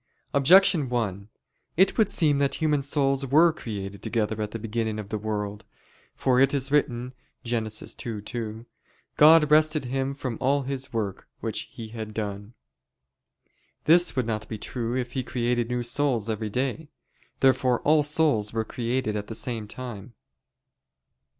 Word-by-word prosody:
Objection 155 0 +5
1: 105 -5 -2 0.5
It 190 +2 +4
would 215 -3 +3
seem 150 -4 +3
that 140 -1 +1
human 150 -3 +1
souls 135 -1 +1
were 160 +5 +5
created 100 -7 -7
together 110 -1 -1
at 105 - -2
the 115 - -5
beginning 110 0 -3
of 105 -2 -7
the 110 - -2
world. 105 -1 -4 0.5
For 130 -1 +2
it 135 +1 +4
is 135 0 -1
written 125 -3 0 0.3
(Gen. 115 -2 -1
2:2): 110 +1 -5 0.5
"God 150 0 +7
rested 155 -1 +4
Him 135 +2 -2
from 130 -5 -5
all 140 +2 +2
His 135 0 -4
work 105 -4 -4
which - - -4
He 115 -1 -9
had 110 -1 -7
done." 105 +1 -5 1.3
This 170 +1 +4
would 130 -3 0
not 110 -2 -3
be 110 - -4
true 120 +2 -3
if 125 -1 -3
He 130 - -2
created 120 -1 -1
new 125 0 -1
souls 120 -3 0
every 110 0 -3
day. 135 +7 -3 0.5
Therefore 130 -2 +3
all 155 +1 +4
souls 145 -8 +2
were 110 -1 -1
created 120 -1 -2
at 105 -1 -4
the 110 - -5
same 115 -3 -3
time. 115 -1 -8
120 Hz, 155 wpm, -26 LUFS, 110-140 Hz, 1.3 s, God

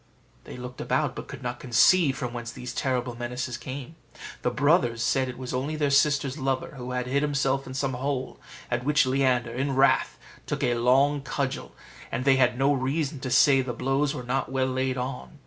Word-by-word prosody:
They - - -9
looked 125 0 -8
about, - - 0
but - - -7
could - - -9
not 120 0 -4
conceive 135 +4 +4
from 125 -2 -4
whence 120 0 -5
these 125 +1 -7
terrible 125 -3 -1
menaces 125 +1 -4
came. 130 +5 -7 0.4
The - - +1
brothers 125 -4 +2
said 130 +1 +1
it 125 - -7
was 130 0 -6
only 135 +5 -2
their 145 -2 0
sister's 140 0 +2
lover, 135 -1 -2
who 125 -1 -7
had 125 0 -1
hid 135 +3 0
himself 140 -2 0
in 130 - -7
some 135 -1 -1
hole; 130 +1 -3 0.3
at 120 0 0
which 145 +1 +3
Leander, 130 -3 +1
in 135 +2 -1
wrath, 135 +1 +3 0.3
took - - -2
a 120 - +2
long 135 +5 +3
cudgel, 135 -1 -3 0.4
and 130 - -2
they 135 -1 +5
had 125 -2 +3
no 135 +2 +3
reason 140 +2 -1
to 130 - -4
say 135 +1 +5
the 125 -1 -4
blows 135 +4 0
were 125 - -5
not 130 +1 -2
well 130 -1 +1
laid 130 0 -1
on. 125 +4 -5
130 Hz, 200 wpm, -26 LUFS, 125-140 Hz, 0.4 s, they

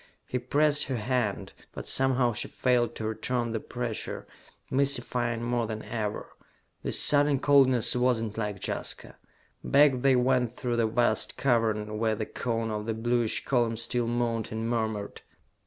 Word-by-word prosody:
He 125 - -3
pressed 145 +4 +2
her 130 - -3
hand, 115 -2 -2 0.2
but - - -8
somehow 130 -2 +2
she - - -3
failed 120 -2 0
to 110 - -5
return 120 +2 -2
the 110 - -2
pressure, 120 -1 -5 0.5
mystifying 125 -4 -1
more 120 -1 -1
than 110 -1 -5
ever. 110 -3 -4 0.5
This - - +4
sudden 145 -1 +5
coldness 130 -5 +4
was 125 -1 +2
not 110 -2 -4
like 105 -2 -3
Jaska. - - -5 0.5
Back 140 -3 +4
they 135 0 +4
went 125 -1 +1
through 120 -1 -2
the 115 -1 +2
vast 115 -1 0
cavern 110 -4 0
where 110 -1 +1
the 110 - -3
cone 115 -1 -3
of 105 0 -4
the 115 - -1
bluish 120 0 0
column 120 -4 +1
still 115 +1 -1
moaned 115 -2 -1
and 110 +1 -3
murmured. 110 -3 -3
120 Hz, 155 wpm, -28 LUFS, 110-125 Hz, 0.5 s, sudden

